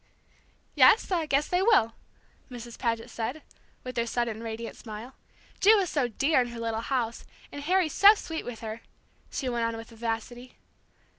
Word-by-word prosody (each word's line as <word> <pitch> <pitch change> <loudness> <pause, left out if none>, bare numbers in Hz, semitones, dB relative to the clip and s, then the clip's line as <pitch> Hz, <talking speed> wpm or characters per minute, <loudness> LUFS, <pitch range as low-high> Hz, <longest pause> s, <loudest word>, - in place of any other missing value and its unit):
"Yes, 435 - +5
I 335 -4 0
guess 285 +1 +1
they 360 +1 +1
will," 380 - +4 0.6
Mrs. 240 -2 -9
Paget 230 0 -2
said, 245 +8 -4 0.4
with 255 -1 -7
her 235 0 0
sudden 230 -2 -2
radiant 230 0 -6
smile. 220 +3 -9 0.5
"Ju 430 +3 +6
is 375 -5 0
so 280 -5 +1
dear 275 +5 +2
in 245 - -1
her 240 -1 -8
little 225 -1 -2
house, 235 -2 -2 0.3
and 285 - -7
Harry's 355 0 +1
so 410 +2 +8
sweet 325 -5 -5
with 245 -2 -7
her," 220 0 -6 0.5
she 265 - -4
went 240 -2 -1
on 230 0 -1
with 225 0 -9
vivacity. 235 +2 -5
240 Hz, 170 wpm, -28 LUFS, 230-300 Hz, 0.6 s, so